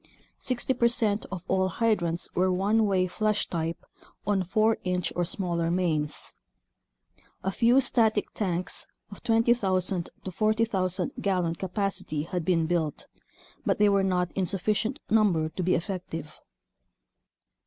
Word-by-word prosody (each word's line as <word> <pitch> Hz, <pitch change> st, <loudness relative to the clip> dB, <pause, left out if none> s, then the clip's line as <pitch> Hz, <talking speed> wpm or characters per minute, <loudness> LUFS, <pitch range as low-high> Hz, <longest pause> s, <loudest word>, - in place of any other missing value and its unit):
Sixty 255 Hz, +1 st, 0 dB
percent 230 Hz, -4 st, +1 dB
of 185 Hz, -2 st, -5 dB
all 190 Hz, 0 st, +2 dB
hydrants 180 Hz, -4 st, 0 dB
were 185 Hz, +1 st, +2 dB
one 205 Hz, +4 st, +2 dB
way 190 Hz, -2 st, +2 dB
flush 215 Hz, +3 st, 0 dB
type 165 Hz, -1 st, -3 dB, 0.4 s
on 200 Hz, -1 st, +2 dB
4 215 Hz, +4 st, +2 dB
inch 180 Hz, -1 st, -1 dB
or 175 Hz, -, +1 dB
smaller 170 Hz, -2 st, -1 dB
mains. 165 Hz, -4 st, -1 dB, 1.1 s
A 190 Hz, -, 0 dB
few 235 Hz, +6 st, +4 dB
static 230 Hz, -4 st, +2 dB
tanks 185 Hz, -3 st, -2 dB, 0.2 s
of 200 Hz, -, -10 dB
20,000 200 Hz, -6 st, +2 dB
to 190 Hz, -, -5 dB
40,000 200 Hz, -3 st, +1 dB
gallon 180 Hz, -4 st, +1 dB
capacity 190 Hz, -4 st, -3 dB
had 175 Hz, +1 st, -3 dB
been 165 Hz, -1 st, +2 dB
built, 160 Hz, -3 st, -1 dB, 0.6 s
but -, -, +1 dB
they 210 Hz, 0 st, +5 dB
were 200 Hz, -1 st, +3 dB
not 180 Hz, -2 st, 0 dB
in 190 Hz, -2 st, -1 dB
sufficient 210 Hz, -, -1 dB
number 190 Hz, -8 st, +3 dB
to 185 Hz, -, -5 dB
be 180 Hz, +1 st, +2 dB
effective. 165 Hz, -4 st, -5 dB
190 Hz, 130 wpm, -27 LUFS, 175-215 Hz, 1.1 s, they